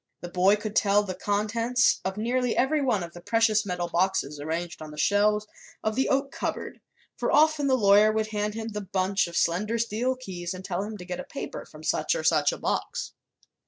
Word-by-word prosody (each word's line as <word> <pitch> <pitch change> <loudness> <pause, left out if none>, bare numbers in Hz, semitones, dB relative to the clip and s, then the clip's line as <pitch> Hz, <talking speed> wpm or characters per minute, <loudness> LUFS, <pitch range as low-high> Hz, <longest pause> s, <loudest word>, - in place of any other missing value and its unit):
The 175 - -6
boy 185 +3 +4
could 210 0 -6
tell 205 0 +4
the 190 -2 -4
contents 230 +6 +1
of 190 +1 -3
nearly 245 +2 0
every 290 +4 +2
one 235 -9 +1
of 170 0 -8
the 175 - -11
precious 220 +1 +2
metal 180 -1 -2
boxes 170 -4 0
arranged 165 +3 -4
on 155 - -7
the 150 - -11
shelves 210 +5 +2 0.4
of 215 - 0
the 265 +4 +1
oak 275 0 +1
cupboard, - - -4 0.3
for - - -1
often 310 -1 +4
the 260 -1 +3
lawyer 205 0 +6
would 220 0 -1
hand 210 0 -2
him 225 0 -4
the 210 -1 -4
bunch 190 0 0
of 170 - -5
slender 210 +7 +1
steel 235 +3 0
keys 185 -8 -6
and 185 +1 -9
tell 185 -1 -2
him 210 +1 -5
to 180 - -9
get 180 0 -5
a - - -4
paper - - -7
from - - -14
such - - +1
or - - -3
such - - +3
a - - -5
box. - - -3
210 Hz, 215 wpm, -26 LUFS, 185-230 Hz, 0.4 s, lawyer